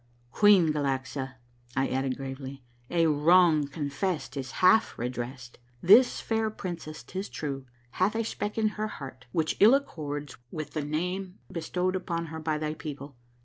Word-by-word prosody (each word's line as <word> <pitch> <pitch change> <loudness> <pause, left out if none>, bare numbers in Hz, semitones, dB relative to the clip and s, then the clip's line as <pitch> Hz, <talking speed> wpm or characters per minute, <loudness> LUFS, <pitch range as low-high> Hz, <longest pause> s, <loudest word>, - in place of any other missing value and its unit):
" 120 0 -35
Queen 195 -7 +5
Galaxa," 135 -2 -2 0.4
I 135 +1 +2
added 130 0 -1
gravely, 135 0 -7
" 120 0 -34
a 170 -1 +3
wrong 155 0 +5
confessed 145 +5 -3
is 135 -2 -5
half 185 +4 +4
redressed. 120 0 -5 0.2
This 215 +8 +7
fair 220 -1 0
princess, 170 -9 -6
'tis 190 +9 -5
true, 135 -3 -5 0.2
hath 190 +8 +1
a 230 - +1
speck 210 -1 -4
in 220 -1 +3
her 215 0 -3
lieart 130 -3 -9
which 160 +2 0
ill 220 +6 +8
accords 145 - -4
with 155 +2 -5
the 155 - -2
name 180 +5 -3
bestowed 180 +2 -1
upon 170 -2 -2
her 160 - -4
by 155 -1 -1
thy 155 0 -2
people. 145 -3 -7
155 Hz, 160 wpm, -28 LUFS, 135-185 Hz, 0.4 s, ill